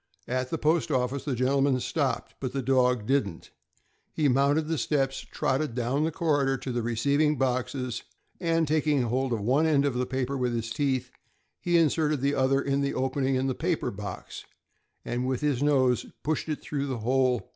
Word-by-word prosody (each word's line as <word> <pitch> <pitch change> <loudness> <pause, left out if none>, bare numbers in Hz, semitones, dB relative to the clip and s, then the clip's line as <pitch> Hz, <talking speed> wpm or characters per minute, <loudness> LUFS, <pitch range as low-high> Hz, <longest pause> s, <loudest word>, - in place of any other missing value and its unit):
At 130 0 -1
the 165 - -2
post 160 +2 +1
office, 130 -1 -1
the 140 -4 -1
gentleman 135 +1 +2
stopped, 135 -2 -2
but 130 -2 -4
the 135 -1 -2
dog 125 -3 +2
didn't. 105 -10 -1 0.6
He 155 -2 +1
mounted 140 +4 +2
the 160 -2 -1
steps, 135 -3 0
trotted 135 -2 -2
down 130 +5 0
the 160 - -1
corridor 145 -5 +1
to 130 - -5
the 120 0 -1
receiving 140 +6 +1
boxes, 130 -1 -1 0.4
and 165 -1 +1
taking 150 -3 +2
hold 130 +2 -1
of 115 -3 -1
one 135 +9 +2
end 145 -3 +3
of 140 - +1
the 125 0 -1
paper 130 0 -2
in 120 - -2
his 115 0 -3
teeth, 130 -1 -1 0.5
he 175 -1 +2
inserted 155 -3 +2
the 140 +1 +1
other 135 0 +2
in 140 0 0
the 140 0 -1
opening 130 +1 0
into 130 +1 0
the - - 0
paper 170 0 0
box, 100 -2 -7 0.6
and 125 +1 -2
with 130 +1 -1
his 145 -4 0
nose 130 -4 +2 0.2
pushed 155 +1 -1
it 155 - -3
through 140 -1 -3
the 130 -3 -2
hole. 130 -1 +2
135 Hz, 190 wpm, -27 LUFS, 125-145 Hz, 0.6 s, end